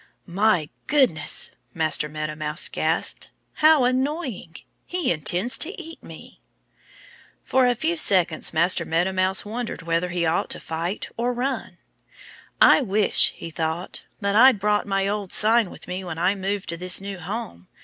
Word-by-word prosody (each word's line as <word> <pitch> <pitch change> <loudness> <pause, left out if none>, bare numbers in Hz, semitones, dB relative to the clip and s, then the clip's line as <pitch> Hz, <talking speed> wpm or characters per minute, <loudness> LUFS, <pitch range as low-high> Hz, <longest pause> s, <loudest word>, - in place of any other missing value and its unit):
"My 180 -4 +1 0.2
goodness!" 260 - +2 0.2
Master 155 -1 +2
Meadow 155 0 -4
Mouse 150 +2 0
gasped. - - -2 0.3
"How 310 -3 +6
annoying! 255 - -2 0.3
He 360 -1 -1
intends 175 - 0
to 370 +5 -2
eat 330 -2 -10
me!" - - -12 1.0
For 260 -1 +2
a 245 - +2
few 320 +8 -1
moments 175 -5 +1
Master 170 +3 +3
Meadow 175 +4 0
Mouse 190 +1 +1
wondered 225 -3 -5
whether 170 +1 -1
he 175 -1 -1
ought 160 +1 0
to - - -3
fight 170 +5 -4
or 240 +2 -1
run. 255 +2 -4 0.8
"I - - +6
wish," 210 -4 +2
he 165 - -8
thought, 160 +3 -4 0.2
"that 200 0 0
I'd 250 -1 +6
brought 210 +1 0
my 195 0 0
old 205 -2 -3
sign 220 -1 +3
with - - -13
me 185 +1 -5
when 175 -3 -6
I 180 +4 +2
moved 195 -1 -3
to 170 - -3
this 180 +1 +1
new 195 -1 -7
home. 175 - -7
195 Hz, 160 wpm, -23 LUFS, 170-240 Hz, 1.0 s, How